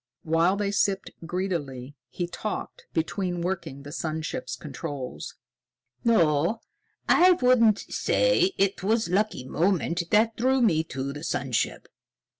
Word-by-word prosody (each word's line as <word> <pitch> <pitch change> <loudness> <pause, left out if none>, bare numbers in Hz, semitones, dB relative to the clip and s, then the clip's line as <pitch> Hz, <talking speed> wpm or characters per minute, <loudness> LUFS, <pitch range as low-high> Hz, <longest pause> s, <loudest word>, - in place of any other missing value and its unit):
While 165 +4 +2
they 200 0 -1
sipped 200 -1 0 0.2
greedily, 145 -8 -3
he 175 - -3
talked, 205 +4 -6
between 175 +2 -2
working 170 -7 -4
the 145 - -9
sun 160 0 -3
ship's 260 +10 -4
controls. 135 -2 -6 0.7
"No, 170 -2 +3 0.5
I 365 +1 +6
wouldn't 250 - +4
say 445 -7 +2
it 195 -1 +1
was 220 +4 +1
a - - -4
lucky 210 -9 0
moment 175 +1 +1
that 220 +1 +3
drew 260 +3 +2
me 175 -10 +3
to 135 -2 -4
the 150 +2 -8
sun 135 -5 -2
ship. 120 - -1
180 Hz, 135 wpm, -26 LUFS, 155-215 Hz, 0.7 s, I